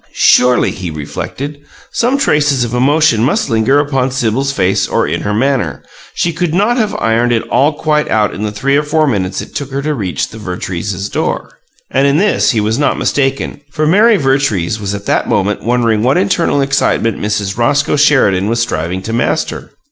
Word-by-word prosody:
Surely, 125 Hz, 0 st, +4 dB
he 90 Hz, -3 st, -6 dB
reflected, 135 Hz, -, -6 dB, 0.3 s
some 250 Hz, +4 st, +1 dB
traces 145 Hz, -, +2 dB
of 120 Hz, 0 st, -4 dB
emotion 135 Hz, -2 st, +2 dB
must 130 Hz, -, 0 dB
linger 115 Hz, +5 st, +2 dB
upon 135 Hz, -3 st, 0 dB
Sibyl's 130 Hz, +2 st, -1 dB
face 95 Hz, -8 st, 0 dB
or -, -, 0 dB
in -, -, -2 dB
her 105 Hz, -, -2 dB
manner; 115 Hz, -, -1 dB, 0.3 s
she 170 Hz, -, 0 dB
could 170 Hz, 0 st, -1 dB
not 210 Hz, +6 st, +2 dB
have 220 Hz, -4 st, -1 dB
ironed 115 Hz, +2 st, +1 dB
it 115 Hz, -1 st, 0 dB
all 140 Hz, +5 st, +2 dB
quite 150 Hz, 0 st, 0 dB
out 105 Hz, -2 st, +1 dB
in -, -, -7 dB
the 105 Hz, -1 st, -2 dB
three 135 Hz, +7 st, 0 dB
or 145 Hz, -, +3 dB
four 155 Hz, +1 st, +1 dB
minutes 100 Hz, -8 st, -1 dB
it -, -, -14 dB
took 140 Hz, -2 st, -4 dB
her 140 Hz, 0 st, -4 dB
to 155 Hz, +1 st, -1 dB
reach 95 Hz, -, -3 dB
the 110 Hz, -, -11 dB
Vertreeses' 95 Hz, 0 st, -4 dB
door. -, -, -3 dB, 0.4 s
And 135 Hz, +1 st, +2 dB
in 140 Hz, +1 st, +2 dB
this 205 Hz, +4 st, +2 dB
he 115 Hz, -, +1 dB
was 110 Hz, +3 st, 0 dB
not 145 Hz, -, +1 dB
mistaken, 135 Hz, +1 st, -1 dB
for 155 Hz, +2 st, -2 dB
Mary 210 Hz, +7 st, +4 dB
Vertrees 135 Hz, -, 0 dB
was 100 Hz, -1 st, -3 dB
at 100 Hz, 0 st, -8 dB
that -, -, 0 dB
moment 105 Hz, +1 st, 0 dB
wondering 115 Hz, -2 st, +1 dB
what 125 Hz, +4 st, +2 dB
internal 120 Hz, +7 st, +1 dB
excitement 135 Hz, -5 st, 0 dB
Mrs. 105 Hz, -1 st, -2 dB
Roscoe 140 Hz, +6 st, +1 dB
Sheridan 130 Hz, -10 st, +3 dB
was 115 Hz, +1 st, 0 dB
striving 95 Hz, -5 st, -2 dB
to 115 Hz, -, -4 dB
master. 120 Hz, +7 st, -2 dB
125 Hz, 195 wpm, -14 LUFS, 105-145 Hz, 0.4 s, Surely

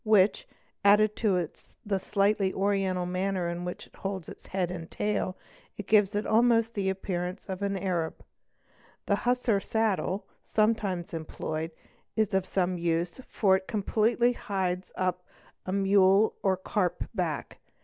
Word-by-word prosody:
which, 210 Hz, -2 st, +4 dB, 0.4 s
added 210 Hz, +1 st, +5 dB
to 185 Hz, -6 st, +1 dB, 0.4 s
the 200 Hz, -2 st, 0 dB
slightly 200 Hz, 0 st, +1 dB
oriental 195 Hz, -2 st, +1 dB
manner 185 Hz, 0 st, -1 dB
in 170 Hz, +1 st, -3 dB
which 180 Hz, 0 st, -5 dB
it -, -, -22 dB
holds 190 Hz, -3 st, -4 dB
its -, -, -11 dB
head' 185 Hz, -2 st, -1 dB
and 170 Hz, -2 st, -6 dB
tail, 205 Hz, -3 st, -1 dB, 0.5 s
gives 205 Hz, -1 st, +4 dB
it 210 Hz, -, 0 dB
almost 230 Hz, 0 st, +3 dB
the 195 Hz, -3 st, 0 dB
appearance 185 Hz, -1 st, -3 dB
of 190 Hz, 0 st, -5 dB
an 200 Hz, -1 st, 0 dB
Arab. 175 Hz, -4 st, -2 dB, 0.8 s
The 200 Hz, -, +2 dB
hussar 245 Hz, -3 st, +1 dB
saddle, 210 Hz, -2 st, 0 dB, 0.2 s
sometimes 210 Hz, -6 st, 0 dB
employed, 160 Hz, 0 st, -4 dB, 0.5 s
is 220 Hz, -3 st, +1 dB
of 190 Hz, -1 st, +1 dB
some 180 Hz, -2 st, 0 dB
use, 170 Hz, +6 st, -1 dB
for 190 Hz, -3 st, +3 dB
it 190 Hz, -, -10 dB
completely 225 Hz, +3 st, +2 dB
hides 185 Hz, -4 st, -2 dB
up 180 Hz, -1 st, -1 dB, 0.4 s
a -, -, -1 dB
mule 195 Hz, +1 st, +4 dB
or 190 Hz, -1 st, +2 dB
carp 185 Hz, -2 st, -1 dB
back. 175 Hz, -8 st, -3 dB
195 Hz, 140 wpm, -28 LUFS, 180-210 Hz, 0.8 s, added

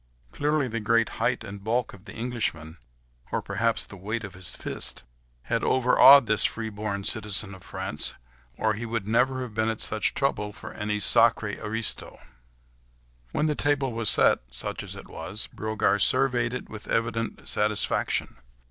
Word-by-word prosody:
Clearly 150 Hz, -1 st, 0 dB
the 115 Hz, -1 st, -3 dB
great 115 Hz, +1 st, +2 dB
height 115 Hz, 0 st, 0 dB
and 100 Hz, -2 st, -9 dB
bulk 120 Hz, +3 st, -1 dB
of 100 Hz, +1 st, -15 dB
the -, -, -10 dB
Englishman, 105 Hz, -10 st, -3 dB, 0.5 s
or -, -, 0 dB
perhaps 115 Hz, -1 st, -1 dB
the -, -, -12 dB
weight 105 Hz, +5 st, -4 dB
of 100 Hz, -3 st, -8 dB
his 90 Hz, 0 st, -4 dB
fist, -, -, -1 dB, 0.4 s
had -, -, -1 dB
overawed 130 Hz, +1 st, +7 dB
this 110 Hz, -1 st, +3 dB
free 110 Hz, -1 st, -1 dB
born 100 Hz, -1 st, -4 dB
citizen 105 Hz, -2 st, 0 dB
of 95 Hz, -, -12 dB
France, -, -, 0 dB, 0.4 s
or 110 Hz, 0 st, +1 dB
he 110 Hz, +3 st, -5 dB
would 115 Hz, -3 st, -3 dB
never 130 Hz, +4 st, +1 dB
have 120 Hz, -4 st, -8 dB
been 110 Hz, +1 st, 0 dB
at 110 Hz, -, -3 dB
such 110 Hz, -, +1 dB
trouble 105 Hz, -7 st, -1 dB
for 125 Hz, -, -10 dB
any 105 Hz, 0 st, -2 dB
sacrré 105 Hz, 0 st, +3 dB
aristo. 110 Hz, +1 st, -1 dB, 1.1 s
When 150 Hz, -, 0 dB
the 155 Hz, -, +1 dB
table 140 Hz, -3 st, 0 dB
was 115 Hz, -2 st, +2 dB
set—such -, -, +1 dB
as -, -, -8 dB
it -, -, -11 dB
was—Brogard 105 Hz, +3 st, -1 dB
surveyed 125 Hz, -2 st, +3 dB
it -, -, -6 dB
with 110 Hz, -1 st, -10 dB
evident 115 Hz, 0 st, -2 dB
satisfaction. 105 Hz, 0 st, 0 dB
110 Hz, 160 wpm, -26 LUFS, 105-120 Hz, 1.1 s, overawed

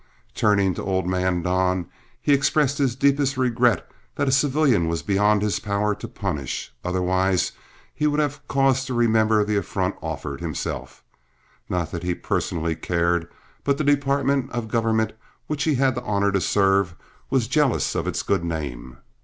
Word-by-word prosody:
Turning 100 Hz, -3 st, +2 dB
to -, -, -5 dB
old 95 Hz, -2 st, -1 dB
man 90 Hz, -1 st, 0 dB
Don, 90 Hz, 0 st, +1 dB, 0.3 s
he 145 Hz, -, +2 dB
expressed 140 Hz, 0 st, +2 dB
the 140 Hz, -, +4 dB
deepest 140 Hz, +2 st, +1 dB
regret 120 Hz, -2 st, +2 dB, 0.3 s
that 140 Hz, -, 0 dB
a -, -, +3 dB
civilian 135 Hz, -, +3 dB
was 85 Hz, 0 st, -2 dB
beyond 105 Hz, +1 st, +2 dB
his 105 Hz, -1 st, 0 dB
power 105 Hz, 0 st, 0 dB
to 110 Hz, +3 st, -7 dB
punish, 90 Hz, -, -4 dB
otherwise 95 Hz, +1 st, +1 dB, 0.4 s
he 150 Hz, -, 0 dB
would 150 Hz, 0 st, +1 dB
have 145 Hz, -1 st, -2 dB
cause 135 Hz, -1 st, +2 dB
to 130 Hz, -2 st, -3 dB
remember 110 Hz, -2 st, +3 dB
the 105 Hz, 0 st, 0 dB
affront 100 Hz, -, -1 dB
offered 70 Hz, 0 st, -5 dB
himself; 80 Hz, -4 st, -5 dB, 0.7 s
not 85 Hz, -3 st, -1 dB
that 85 Hz, -, -4 dB
he 90 Hz, 0 st, -1 dB
personally 85 Hz, -2 st, -2 dB
cared, 85 Hz, 0 st, 0 dB, 0.4 s
but 140 Hz, -1 st, +1 dB
the 155 Hz, -, -1 dB
department 140 Hz, -2 st, +1 dB
of 120 Hz, -2 st, -3 dB
government 110 Hz, -1 st, +1 dB, 0.3 s
which 150 Hz, -2 st, -2 dB
he 155 Hz, -3 st, +2 dB
had 130 Hz, 0 st, +2 dB
the 120 Hz, -, -4 dB
honor 100 Hz, -3 st, +1 dB
to 95 Hz, -1 st, +1 dB
serve 95 Hz, -3 st, +2 dB, 0.3 s
was 130 Hz, -4 st, +1 dB
jealous 145 Hz, -2 st, +1 dB
of -, -, -2 dB
its -, -, -2 dB
good -, -, 0 dB
name. 70 Hz, -7 st, -5 dB
105 Hz, 165 wpm, -23 LUFS, 90-135 Hz, 0.7 s, the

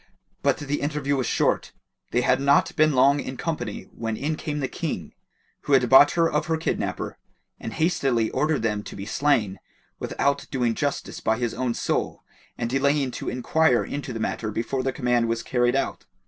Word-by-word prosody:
But -, -, +2 dB
the 145 Hz, 0 st, -3 dB
interview 145 Hz, -1 st, -1 dB
was 130 Hz, -2 st, -1 dB
short; -, -, 0 dB, 0.4 s
they 120 Hz, -, +1 dB
had 130 Hz, +2 st, +2 dB
not 140 Hz, 0 st, +3 dB
been 155 Hz, 0 st, +4 dB
long 135 Hz, +2 st, +4 dB
in 130 Hz, -2 st, -5 dB
company 120 Hz, -11 st, -3 dB
when 115 Hz, -1 st, -3 dB
in 155 Hz, +3 st, -1 dB
came 150 Hz, -1 st, -4 dB
the 135 Hz, -, -1 dB
King, 130 Hz, -, -4 dB, 0.5 s
who 145 Hz, -, +1 dB
had 130 Hz, -2 st, +5 dB
bought 140 Hz, +2 st, +8 dB
her 165 Hz, -1 st, +3 dB
of 165 Hz, -, -1 dB
her 160 Hz, -1 st, +1 dB
kidnapper, 160 Hz, -, -3 dB, 0.4 s
and 115 Hz, -, -6 dB
hastily 135 Hz, -9 st, +1 dB
ordered 150 Hz, -5 st, 0 dB
them 105 Hz, -2 st, 0 dB
to -, -, -9 dB
be 100 Hz, -, -6 dB
slain, 110 Hz, -5 st, +1 dB, 0.4 s
without 140 Hz, 0 st, -1 dB
doing 125 Hz, -4 st, 0 dB
justice 145 Hz, +4 st, -3 dB
by 110 Hz, 0 st, +1 dB
his 120 Hz, -1 st, -1 dB
own 125 Hz, -1 st, -1 dB
soul -, -, -2 dB, 0.3 s
and 115 Hz, -, -2 dB
delaying 135 Hz, +1 st, +1 dB
to -, -, -4 dB
enquire 125 Hz, +2 st, +2 dB
into 140 Hz, -2 st, -5 dB
the 115 Hz, -, -5 dB
matter 110 Hz, 0 st, -2 dB
before 115 Hz, +5 st, -2 dB
the 130 Hz, +1 st, -1 dB
command 125 Hz, -3 st, +1 dB
was 115 Hz, 0 st, -1 dB
carried 120 Hz, 0 st, +1 dB
out. 135 Hz, -, -2 dB
130 Hz, 190 wpm, -25 LUFS, 120-145 Hz, 0.5 s, bought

